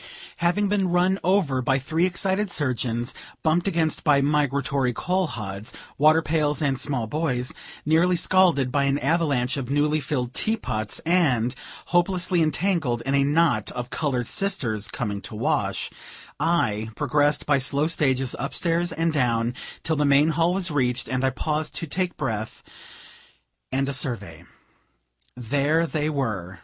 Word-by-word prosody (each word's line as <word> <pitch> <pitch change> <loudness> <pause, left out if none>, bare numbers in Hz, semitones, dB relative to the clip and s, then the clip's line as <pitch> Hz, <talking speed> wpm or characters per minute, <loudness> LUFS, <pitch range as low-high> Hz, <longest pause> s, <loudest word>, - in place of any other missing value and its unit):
Having 175 +5 +1
been 195 -2 +1
run 180 +2 +2
over 170 -8 +2
by 135 +2 +2
three 160 +6 0
excited 190 +2 0
surgeons, 125 - -1 0.3
bumped 165 +3 +2
against 165 -5 0
by 145 -2 +4
migratory 140 -2 +1
coal 185 +4 0
hods, 105 -2 -6 0.2
water 155 +3 +4
pails, 150 -1 0
and 140 -4 0
small 135 -4 -1
boys, 125 -1 -2 0.3
nearly 165 +4 +3
scalded 170 -7 +3
by 140 +1 +1
an 140 0 +1
avalanche 145 -4 0
of 130 -3 -4
newly 150 +2 +2
filled 130 -4 -3
tea 220 +1 0
pots, 110 - -2
and 135 -9 +2 0.4
hopelessly 175 0 +2
entangled 155 -7 0
in 135 - -1
a 140 0 +4
knot 140 -7 +2
of 125 0 -5
colored 130 -6 -1
sisters 120 - -1
coming 100 -1 -4
to 110 - -8
wash, 105 - -1 0.5
I 120 -10 0
progressed 145 +3 +1
by 145 -2 +3
slow 140 +3 +2
stages 135 -5 0
up 140 - -4
stairs 170 0 0
and 165 0 0
down, 120 -4 +1 0.3
till 160 -1 0
the 150 - +2
main 145 +2 +4
hall 165 +2 +2
was 185 -2 -1
reached, 125 -3 0
and 130 0 -1
I 135 - +3
paused 155 +3 -3
to - - -2
take 180 +3 -2
breath 110 -6 -4 1.1
and 135 +1 0
a 140 - -2
survey. 105 - -3 0.9
There 145 +7 +1
they 155 -2 -1
were! 105 - -3
145 Hz, 155 wpm, -24 LUFS, 125-165 Hz, 1.1 s, by